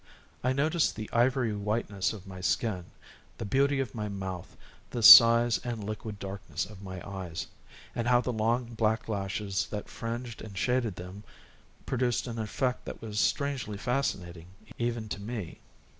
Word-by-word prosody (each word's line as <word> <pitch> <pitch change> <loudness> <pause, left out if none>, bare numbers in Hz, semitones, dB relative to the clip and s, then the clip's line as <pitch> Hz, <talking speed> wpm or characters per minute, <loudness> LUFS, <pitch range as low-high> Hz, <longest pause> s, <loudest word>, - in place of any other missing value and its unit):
I 125 - +2
noticed 155 +5 +1
the 110 -1 -6
ivory 120 -1 +2
whiteness 105 -2 -1
of 105 -3 -9
my 95 -1 -9
skin, 95 -3 0 0.5
the 115 - -4
beauty 135 +6 +2
of 130 -6 -2
my 105 -2 -3
mouth, 95 -3 -6 0.3
the 120 - -3
size 115 +1 +10
and 120 -3 -5
liquid 105 0 -5
darkness 95 -5 -4
of 100 0 -12
my 95 -2 -8
eyes, 95 -4 -5 0.5
and 115 - -2
how 125 0 +5
the 125 0 -2
long, 115 +2 0
black 110 0 0
lashes 100 -1 -2
that 105 -1 -5
fringed 115 0 -5
and 105 -3 -9
shaded 125 -3 0
them 90 +4 -9 0.6
produced 125 -2 0
an 115 -2 -5
effect 125 +3 -2
that - - -7
was 105 -2 -4
strangely 135 -8 0
fascinating 95 -9 -2 0.3
even 120 -2 -1
to 100 - -4
me. 105 -5 -6
110 Hz, 160 wpm, -29 LUFS, 100-120 Hz, 0.6 s, size